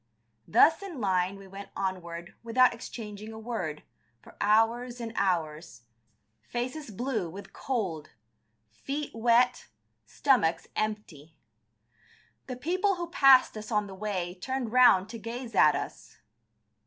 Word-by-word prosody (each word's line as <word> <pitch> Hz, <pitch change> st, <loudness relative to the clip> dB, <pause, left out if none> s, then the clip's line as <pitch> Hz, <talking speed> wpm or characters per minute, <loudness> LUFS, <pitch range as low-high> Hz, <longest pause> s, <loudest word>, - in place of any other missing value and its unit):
Thus 320 Hz, -, +5 dB
in 370 Hz, -8 st, -7 dB
line 190 Hz, -2 st, 0 dB
we 195 Hz, -, -12 dB
went 195 Hz, +1 st, -10 dB
onward 175 Hz, -2 st, -4 dB
without 245 Hz, +2 st, +4 dB
exchanging 215 Hz, -2 st, -8 dB
a 220 Hz, -, -9 dB
word, 215 Hz, -10 st, -4 dB, 0.4 s
for -, -, -17 dB
hours 230 Hz, +4 st, +2 dB
and 230 Hz, -1 st, -5 dB
hours, 165 Hz, -8 st, -2 dB, 0.6 s
faces 250 Hz, -, -5 dB
blue 220 Hz, -3 st, -2 dB
with 195 Hz, +3 st, -10 dB
cold, 195 Hz, -, -3 dB, 0.6 s
feet 280 Hz, -, -5 dB
wet, 240 Hz, +2 st, +2 dB, 0.4 s
stomachs 175 Hz, -, +2 dB
empty. 195 Hz, -8 st, -4 dB, 1.1 s
The 255 Hz, -, -5 dB
people 370 Hz, +9 st, 0 dB
who 345 Hz, -1 st, -6 dB
passed 270 Hz, -7 st, +6 dB
us 215 Hz, +1 st, -8 dB
on 210 Hz, -1 st, +1 dB
the 195 Hz, -, -9 dB
way 190 Hz, -3 st, -4 dB
turned 260 Hz, -2 st, -3 dB
round 245 Hz, -6 st, +6 dB
to 230 Hz, -, -7 dB
gaze 230 Hz, +2 st, -6 dB
at 155 Hz, -6 st, +5 dB
us. -, -, -7 dB
220 Hz, 130 wpm, -28 LUFS, 185-250 Hz, 1.1 s, passed